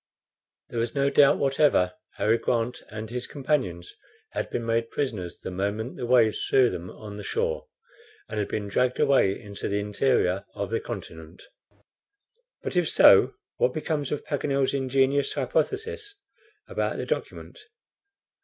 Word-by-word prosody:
There 120 - -3
was 115 +3 -1
no 140 0 +2
doubt 140 -1 +6
whatever 135 -10 +3 0.2
Harry 110 +2 +2
Grant 120 0 -1
and 110 +1 -6
his 125 +2 -4
companions 130 - -2 0.4
had - - -3
been 115 - -3
made 115 0 0
prisoners 105 -11 -3
the - - -7
moment 100 +6 -2
the 120 - -4
waves 120 -3 +4
threw 130 -2 +4
them 90 +1 -6
on 105 0 -9
the - - -7
shore, 480 +2 -2 0.6
and 105 -2 -2
been 105 -1 -3
dragged 125 +5 +1
away 115 -8 +3
into 100 -2 -6
the 100 - 0
interior 100 -2 +1
of 100 +1 -4
the 115 - +1
continent. 85 -7 -8 1.2
But - - -4
if 175 -2 +2
so, - - +6 0.2
what 125 - +1
becomes 155 -2 -2
of 150 - -3
Paganel's 140 -2 0
ingenious 135 +1 +1
hypothesis 405 - -2 0.5
about - - -2
the - - -3
document? 485 - -4
120 Hz, 145 wpm, -26 LUFS, 105-140 Hz, 1.2 s, doubt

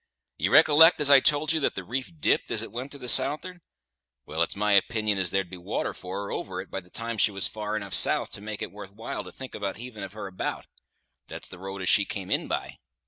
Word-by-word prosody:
You - - 0
recollect 160 +3 +7
as 145 -1 +4
I 140 - +9
told 150 +3 +2
ye 160 - +1
that 140 - 0
the - - -5
reef 130 +2 -4
dipped - - +1
as 110 - +1
it - - -8
went 125 +4 -6
to - - -8
the 125 -2 -9
south'ard? 155 +8 +3 0.6
Well, 80 +2 -3
it's 85 - +1
my 105 +1 0
opinion 105 0 +2
as 95 -2 +1
there'd 95 0 -1
be 90 - -7
water 90 - -3
for 95 +2 -6
her 100 - -6
over 95 -1 -4
it 95 - -8
by - - -3
the 90 -1 -18
time 115 +2 -5
she 100 - +5
was 100 -1 -2
far 105 0 -4
enough 100 -2 -6
south - - +4
to - - -9
make 105 0 -5
it - - -6
worth 100 -1 -10
while 115 +2 -6
to - - -11
think 130 -1 -9
about 100 -2 -4
heaving 115 -2 -9
of 95 0 -7
her 105 - -7
about. 95 -1 -4 0.6
That's - - -5
the 90 - -11
road 95 0 -6
as 90 - +1
she 105 -2 +5
came 95 -2 -6
in - - +1
by." - - -4
105 Hz, 255 wpm, -26 LUFS, 95-125 Hz, 0.6 s, I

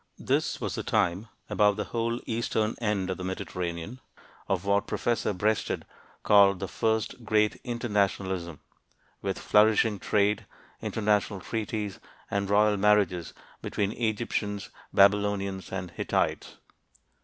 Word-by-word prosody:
This - - 0
was - - -3
the - - -3
time 90 +6 0 0.2
about 105 -1 +3
the 105 - -2
whole 115 +2 -2
eastern 115 -1 0
end 100 -4 0
of 95 - -3
the 95 - -6
Mediterranean 90 +3 -4 0.5
of 95 -1 0
what 100 0 +2
Professor 120 -2 0
Breasted 105 +3 -1 0.4
called 100 -2 +6
the 95 - -3
"first 110 +4 -1
great 105 -1 +2
internationalism," 100 - -1 0.6
with - - -2
flourishing 105 0 +3
trade, 105 +1 +1 0.3
international 105 -2 0
treaties, 105 -1 -3 0.3
and 100 -1 -1
royal 105 0 +4
marriages 100 -4 +2 0.3
between 100 -1 -1
Egyptians, 110 -3 -2 0.2
Babylonians, 100 -1 +2
and 90 -2 -4
Hittites. - - -1
105 Hz, 120 wpm, -28 LUFS, 95-110 Hz, 0.6 s, called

